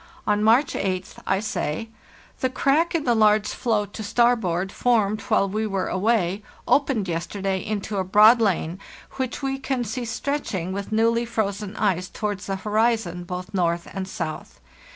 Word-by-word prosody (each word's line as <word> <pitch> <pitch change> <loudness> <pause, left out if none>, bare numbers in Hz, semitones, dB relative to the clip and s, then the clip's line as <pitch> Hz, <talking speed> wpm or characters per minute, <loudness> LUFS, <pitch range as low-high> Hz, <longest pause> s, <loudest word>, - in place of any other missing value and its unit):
On 210 0 +2
March 235 +6 +4
8th 185 -1 -3
I 190 - +2
say: 215 -1 -3 0.2
" - - -26
The 260 - +1
crack 295 +6 +2
in 320 - +1
the 245 - +2
large 215 -1 +4
floe 220 -4 0
to 205 +2 -9
starboard, 205 -5 +1
formed 215 -4 +1
while 195 - +2
we 215 +3 -1
were 195 -2 -2
away, 200 -1 +1 0.3
opened 270 -8 +2
yesterday 190 +3 -2
into 210 -1 -3
a - - +1
broad 215 +5 +6
lane, 185 -4 0 0.4
which 260 +1 -3
we 270 0 -1
can 265 -2 -1
see 245 +1 -4
stretching 225 - -3
with 200 +1 -5
new 225 +1 +3
ly 235 +1 0
frozen 210 -2 -2
ice 185 -4 0
towards 205 -2 -4
the 195 - -1
horizon, 210 -3 0
both 180 +2 -6
north 170 -2 0
and 190 -1 -4
south. 155 -4 -6
210 Hz, 170 wpm, -24 LUFS, 190-230 Hz, 0.4 s, broad